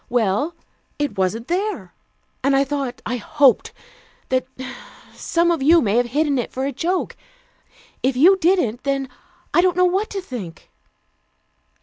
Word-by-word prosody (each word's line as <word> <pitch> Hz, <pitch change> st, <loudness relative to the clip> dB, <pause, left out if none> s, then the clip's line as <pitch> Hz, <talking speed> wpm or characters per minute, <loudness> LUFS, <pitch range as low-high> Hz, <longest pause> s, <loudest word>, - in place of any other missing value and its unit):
Well, 245 Hz, -, 0 dB, 0.4 s
it 290 Hz, -1 st, -2 dB
wasn't 200 Hz, +6 st, -1 dB
there. 395 Hz, +5 st, -2 dB, 0.5 s
And 275 Hz, +1 st, +3 dB
I 275 Hz, -, +4 dB
thought 275 Hz, -3 st, -4 dB
I 245 Hz, +3 st, -2 dB
hoped 275 Hz, +3 st, +3 dB, 0.6 s
that 255 Hz, 0 st, 0 dB, 0.7 s
some 340 Hz, 0 st, +1 dB
of 330 Hz, -4 st, -1 dB
you 325 Hz, +5 st, +6 dB
might 205 Hz, -8 st, 0 dB
have 245 Hz, 0 st, +2 dB
hidden 285 Hz, +2 st, +1 dB
it 240 Hz, -, -4 dB
for 260 Hz, +1 st, -3 dB
a 280 Hz, -, -1 dB
joke. 355 Hz, +5 st, -2 dB, 0.9 s
If 260 Hz, -1 st, 0 dB
you 355 Hz, +9 st, +7 dB
didn't, 320 Hz, -, +1 dB
then 275 Hz, -1 st, -2 dB, 0.4 s
I 345 Hz, -, +5 dB
don't 360 Hz, -1 st, +1 dB
know 365 Hz, -, +5 dB
what 385 Hz, +4 st, 0 dB
to 400 Hz, -, -4 dB
think." 210 Hz, -, -8 dB
275 Hz, 150 wpm, -21 LUFS, 245-345 Hz, 0.9 s, you